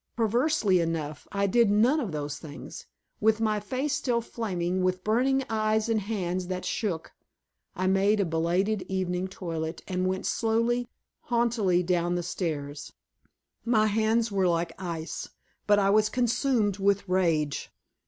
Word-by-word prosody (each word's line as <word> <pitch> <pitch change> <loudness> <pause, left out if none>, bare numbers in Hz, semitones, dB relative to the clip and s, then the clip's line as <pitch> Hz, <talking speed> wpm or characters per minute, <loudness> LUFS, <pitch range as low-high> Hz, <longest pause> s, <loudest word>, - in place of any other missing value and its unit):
Perversely 235 - +2
enough, 160 -3 -3
I 200 0 0
did 230 +2 +4
none 235 +9 +4
of 230 - -3
those 145 -1 -4
things. 150 -3 -9 0.3
With 220 +1 +3
my 215 -1 +1
face 260 +7 -2
still 245 -4 +1
flaming, 185 -6 -2
with 185 0 0
burning 260 +5 +2
eyes 220 0 +1
and 225 -1 +2
hands 185 -3 -2
that 185 0 -4
shook, 180 -8 -2 0.6
I 185 - -1
made 195 +3 +3
a 200 - +2
belated 175 +6 0
evening 185 -1 -1
toilet 165 -3 -5
and 185 0 -1
went 190 0 -2
slowly, 230 +2 +1 0.3
haughtily, 230 -7 +1
down 175 0 +1
the 175 - -1
stairs. 145 -5 -4 0.7
My 225 -2 +3
hands 220 +1 +1
were 190 -2 +2
like 170 -1 0
ice, 170 -2 -5 0.4
but 205 -1 +5
I 195 -1 +3
was 215 +1 +4
consumed 240 -4 +1
with 200 0 +1
rage. 165 -6 0
200 Hz, 145 wpm, -27 LUFS, 175-225 Hz, 0.7 s, but